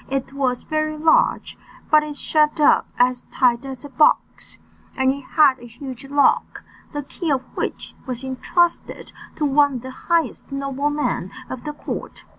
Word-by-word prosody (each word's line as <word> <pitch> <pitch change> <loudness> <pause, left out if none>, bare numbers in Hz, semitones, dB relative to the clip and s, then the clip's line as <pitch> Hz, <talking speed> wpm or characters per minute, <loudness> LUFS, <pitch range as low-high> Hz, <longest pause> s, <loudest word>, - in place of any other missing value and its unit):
It 270 0 -3
was 260 -3 -1
very 310 0 -2
large, 315 +1 +2 0.3
but 305 0 +7
it 300 -1 -6
shut 300 +1 +1
up 295 - +4
as 250 0 +1
tight 240 -1 +2
as 265 -1 -7
a - - -8
box, 280 +3 +1 0.4
and 265 0 +3
it 280 - -8
had 275 -1 +3
a 240 - -11
huge 255 +2 -9
lock, 285 +1 +2 0.3
the 290 -1 -4
key 325 +4 -5
of 265 -3 +1
which - - -4
was 250 0 -4
entrusted 335 +6 -1 0.2
to 300 - -1
one 285 0 +3
of 245 - -4
the 260 - -7
highest 325 -1 -1
noblemen 275 +2 -1 0.2
of 255 +2 -7
the 300 - -4
court. 295 - -7
275 Hz, 165 wpm, -21 LUFS, 260-300 Hz, 0.4 s, but